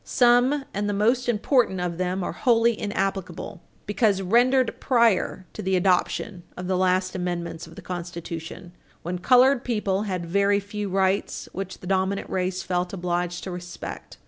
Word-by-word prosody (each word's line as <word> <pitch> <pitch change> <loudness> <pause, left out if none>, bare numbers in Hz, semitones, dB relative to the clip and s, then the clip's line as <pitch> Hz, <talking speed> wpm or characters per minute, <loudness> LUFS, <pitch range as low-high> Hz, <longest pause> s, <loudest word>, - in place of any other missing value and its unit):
Some, 250 +3 +3
and 205 +1 -1
the 205 - -1
most 240 +5 +2
important, 230 -3 +2
of 175 -1 -3
them 185 +1 -1
are - - -2
wholly 235 -2 +3
inapplicable 195 -3 -3 0.2
because 205 -1 +2
rendered 245 +5 +3
prior 230 -7 +2
to - - -6
the 190 -1 0
adoption 185 +1 +1 0.2
of 180 - -5
the 185 +1 0
last 185 0 +1
amendments 170 -2 -4
of 165 - -14
the - - -11
Constitution, 170 -1 -6 0.3
when 175 +1 -3
colored 255 +5 +5
people 210 -5 0
had 180 -2 -2
very 200 +3 +2
few 205 0 -5
rights 190 +1 0
which 190 0 -6
the - - -10
dominant 190 +1 -1
race 185 0 -1
felt 180 0 -2
obliged 175 -1 -2
to 190 - -5
respect. 175 0 -8
190 Hz, 160 wpm, -25 LUFS, 180-215 Hz, 0.3 s, colored